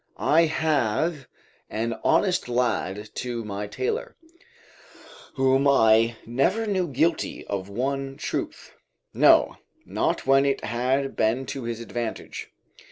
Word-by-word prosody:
I 165 +2 +4
have 155 -1 0 0.4
an 115 +2 -2
honest 180 -3 +2
lad 110 -4 -1
to 120 -2 -4
my 105 0 -4
tailor, 460 - -3 1.2
whom 135 +1 +3
I 115 -3 +4
never 135 - +1
knew 190 -4 0
guilty 155 +4 -1
of 100 -1 -4
one 135 +5 -3
truth, - - -4 0.4
no, - - +5 0.3
not - - -1
when 135 +1 +5
it 140 -1 0
had 130 +4 -1
been 115 +5 +1
to 135 -3 -6
his 115 -1 -4
advantage. 115 -1 -5
130 Hz, 115 wpm, -25 LUFS, 115-150 Hz, 1.2 s, no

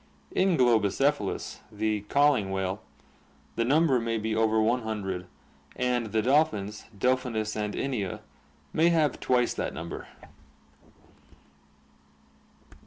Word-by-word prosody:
In 185 -2 +2
Globicephalus, 120 0 +1
the 105 0 -1
ca'ing 140 -9 +3
whale, 95 +1 -2 0.7
the 115 - +1
number 140 +1 +3
may 115 0 -1
be 110 0 -2
over 110 0 +2
one 115 +3 +2
hundred, 95 -5 -4 0.5
and 125 -2 0
the 110 0 0
dolphins, 110 -6 +1
Delphinus 125 -2 0
and 105 -1 -2
Inia, 110 -9 -2 0.5
may 165 +2 +4
have 155 -5 +2
twice 125 -1 +2
that - - -3
number. 85 +2 -6
110 Hz, 105 wpm, -28 LUFS, 105-130 Hz, 0.7 s, may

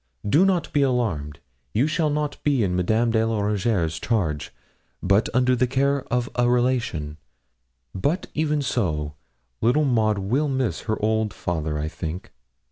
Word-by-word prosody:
Do 150 - +5
not 185 -3 0
be 145 - +3
alarmed. 100 - 0 0.4
You 120 +6 +3
shall 155 0 +1
not 150 0 -2
be 140 -6 +2
in 90 -2 0
Madame 110 +6 +2
de 110 -1 +2
la 115 -1 0
Rougierre's 100 -5 0
charge, 85 -11 -1 0.5
but 100 +4 +3
under 125 0 +3
the 125 +1 +2
care 140 +2 +1
of 120 0 +1
a 120 0 +2
relation; 120 -12 0 0.8
but 145 - -1
even 150 -1 0
so, 75 - -1 0.5
little 125 +7 +3
Maud 110 -5 +2
will 120 +10 0
miss 130 -10 -1
her 110 - 0
old 110 -1 +1
father, 80 -4 -2
I 75 +1 -2
think.' 80 +2 -6
115 Hz, 155 wpm, -24 LUFS, 90-135 Hz, 0.8 s, Do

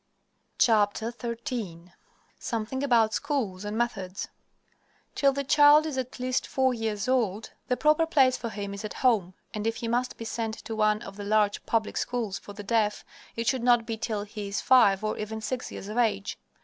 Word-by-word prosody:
XIII 225 - 0 0.5
SOMETHING 230 +3 -3
ABOUT 230 -5 +3
SCHOOLS 245 -11 -2
AND 210 +1 -4
METHODS 200 -5 -3 0.8
Till 275 -1 +3
the 280 +1 -2
child 295 +2 +6
is 310 -4 -3
at 260 0 -4
least 255 0 -1
four 260 -1 +1
years 220 -3 -2
old, 225 -5 0 0.2
the 250 - 0
proper 305 +2 +3
place 270 -6 +4
for 235 - -4
him 200 -2 -5
is 200 - -7
at 215 - -6
home, 195 -7 +3 0.2
and 210 +1 -2
if 225 - 0
he 230 - -4
must 245 +2 -1
be 230 - -7
sent 225 -1 -3
to 225 - -4
one 215 0 +2
of 195 0 -10
the 205 - -6
large 210 0 +1
public 225 -2 0
schools 225 -6 -2
for 205 - -11
the 205 0 -8
deaf 210 0 0 0.3
it 230 - -2
should 260 0 +1
not 240 -1 +4
be 225 - -3
till 220 -2 -3
he 210 0 -7
is 200 - -2
five 210 -6 +5
or 215 - -2
even 220 +1 -4
six 245 +3 -4
years 195 - -7
of 215 +3 -2
age. 210 -4 0
225 Hz, 190 wpm, -27 LUFS, 210-250 Hz, 0.8 s, child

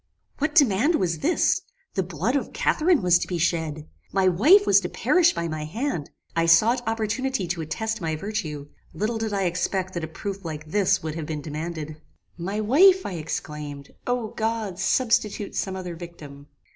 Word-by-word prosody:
"What 300 +2 -1
demand 280 - +4
was 170 - 0
this? 340 +5 +2 0.3
The 190 - +1
blood 185 - -2
of 280 - -2
Catharine 325 - +2
was 175 -1 +5
to - - -3
be 180 - -2
shed! 160 -2 -1 0.2
My 195 -1 +2
wife 300 - +6
was - - +6
to - - -4
perish 350 -2 +3
by 170 - -2
my 155 -1 -4
hand! 180 - -3 0.3
I 165 0 +2
sought 220 +9 +5
opportunity 225 +1 -1
to 175 -2 -2
attest 220 +7 -3
my 160 -2 -1
virtue. 155 -6 -4 0.3
Little 225 +2 -1
did 220 -1 -2
I 200 -1 0
expect 185 +1 -1
that 170 - -3
a - - -2
proof 195 +4 -6
like 155 -2 -6
this 185 +2 +1
would 155 -1 -3
have 160 -1 -5
been 155 -2 -4
demanded. 155 0 -5 0.3
"My 195 +5 -3
wife! 360 - +5
I - - -3
exclaimed: 150 -3 -6 0.2
O 245 -3 -1
God! 220 -5 -2
substitute 215 -1 +1
some 190 -1 -2
other 180 -2 -5
victim. 150 -5 -11
185 Hz, 180 wpm, -25 LUFS, 160-225 Hz, 0.3 s, wife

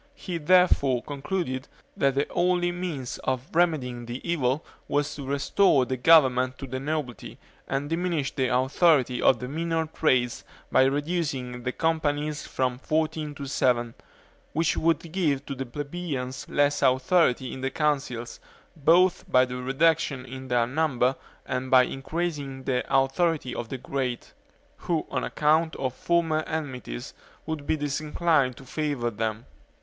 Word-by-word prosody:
He 175 -9 -5
therefore 150 -7 +4
concluded, 145 -2 -3 0.3
that 135 -1 +2
the 140 +1 +1
only 175 0 +1
means 175 -8 -4
of 130 0 -2
remedying 135 -9 +1
the 120 +2 -5
evil 145 -3 0 0.2
was 145 0 0
to 140 -2 -7
restore 140 +1 +3
the 130 - -2
government 130 -3 +4
to - - -6
the 130 0 -4
nobility, 145 -3 -4 0.3
and 135 +2 -2
diminish 165 -3 -1
the 130 -1 0
authority 130 0 +3
of 130 - +5
the 125 - -6
minor 165 +3 -1
trades 130 -6 +1 0.3
by 130 - +5
reducing 140 -4 -2
the 125 +1 -2
companies 150 -1 -1
from 125 -1 -1
fourteen 155 0 -1
to 140 - -6
seven, 120 -3 +1 0.6
which 165 +1 +1
would 165 0 0
give 150 -7 0
the 135 -2 -5
plebeians 140 -2 -5
less 145 0 +2
authority 130 0 +2
in 130 - -7
the 135 - 0
Councils, 135 -5 -2 0.4
both 170 +4 +3
by 130 0 +6
the 125 0 -6
reduction 135 +1 +1
in 130 +1 -8
their 120 -2 +2
number 130 -1 +1 0.3
and 130 0 -3
by 130 -1 +7
increasing 135 0 -4
the 125 -2 0
authority 135 +1 +1
of 115 - -5
the 135 - -4
great; 130 -1 -4 0.4
who, 165 -3 -1
on - - -1
account 160 +2 +2
of 130 -2 -2
former 165 0 +1
enmities, 130 - -5 0.3
would 155 -2 -5
be 160 - +1
disinclined 150 -2 0
to 135 - -12
favor 140 -4 -2
them. 110 +1 -3
140 Hz, 145 wpm, -26 LUFS, 130-160 Hz, 0.6 s, by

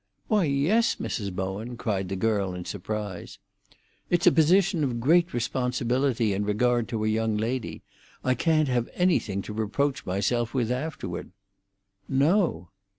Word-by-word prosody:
"Why, 210 -5 +3
yes, 155 +12 +2
Mrs. 100 -4 -3
Bowen," 95 +6 -4
cried 95 -5 -2
the 95 - -2
girl, 100 -2 0
in 90 -1 -6
surprise. 100 -2 -5 0.7
"It's 175 +1 +2
a 180 - +8
position 175 +2 +3
of 125 -4 -1
great 170 +7 +3
responsibility 125 -1 0
in 100 +2 -1
regard 120 +3 +1
to 110 -2 -2
a - - +1
young 110 0 0
lady. 115 +3 -3 0.4
I 130 - +2
can't 155 +3 +2
have 120 -2 0
anything 115 - +1
to 105 - -7
reproach 130 +6 -1
myself 115 +6 -1
with 120 -2 0
afterward." 125 - -4 0.8
"No." 140 - +2
120 Hz, 145 wpm, -26 LUFS, 105-145 Hz, 0.8 s, a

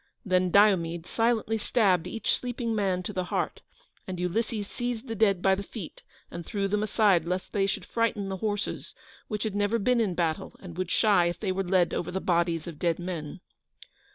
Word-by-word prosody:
Then 185 -1 +2
Diomede 175 -4 +3
silently 225 0 +1
stabbed 195 -7 +2
each 225 - -1
sleeping 240 -2 -3
man 190 -4 0
to 210 - -5
the 185 -1 -1
heart, - - -2 0.5
and 185 -2 -5
Ulysses 205 +4 -1
seized 245 +1 -4
the 225 - -3
dead 200 -4 +2
by 195 - +5
the 190 - -1
feet 200 -3 -8 0.3
and 170 - -6
threw 195 +3 -2
them 205 +1 0
aside 205 -4 +3
lest 180 +2 -3
they 195 -1 +2
should 195 -1 -3
frighten 230 -3 0
the 190 0 -3
horses, 205 +1 -3 0.3
which 210 -1 -3
had 215 -3 -2
never 205 +2 +1
been 235 +3 +2
in 195 -6 0
battle, 165 -2 -1
and 175 -4 -10
would 185 -1 -2
shy 200 -5 +4
if 175 - -3
they 200 -3 -1
were 195 +1 -1
led 180 -1 +2
over 175 - -2
the 190 - -2
bodies 170 -3 +1
of 165 -3 -8
dead 170 -2 +1
men. 175 -2 -5
195 Hz, 200 wpm, -28 LUFS, 180-215 Hz, 0.5 s, by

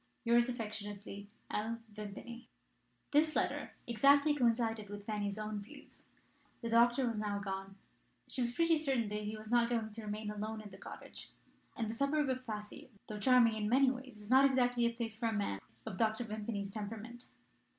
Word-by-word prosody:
"Yours 235 +1 +4
affectionately, 205 -3 -5 0.2
L. 220 +2 -1 0.2
Vimpany." 215 +4 -8 0.6
This 305 +1 +4
letter - - 0
exactly 280 +6 +5
coincided 230 -5 +1
with 205 0 -7
Fanny's 205 -1 -2
own 215 -1 -3
views. 205 - -12 0.6
The 230 - -2
doctor 240 +3 +5
was 230 -3 -1
now 205 -1 -1
gone. 195 -1 -4 0.5
She 255 - -3
was 240 -1 +1
pretty 330 +4 +3
certain 265 -8 0
that 210 0 -2
he 215 +1 -3
was 215 +1 -9
not 240 -1 +4
going 225 -2 -1
to 225 +2 -7
remain 210 0 -4
alone 215 +1 -4
in 210 -1 -9
the 190 - -11
cottage; - - -9 0.5
and 230 -3 -2
the 220 - -3
suburb 280 +3 +1
of 255 0 -2
Passy, 210 +2 -6 0.2
though 210 -1 -4
charming 245 -1 +6
in 210 -1 -1
many 260 +2 +5
ways, 255 -4 -8
is 210 +2 -8
not 265 +1 +8
exactly 245 -3 +3
the 235 - -1
place 230 -2 -3
for 230 +1 -1
a 225 - 0
man 200 - -1 0.3
of 185 - -5
Dr. 220 +1 +2
Vimpany's 210 -2 -4
temperament. 225 +3 -6
225 Hz, 180 wpm, -35 LUFS, 210-245 Hz, 0.6 s, not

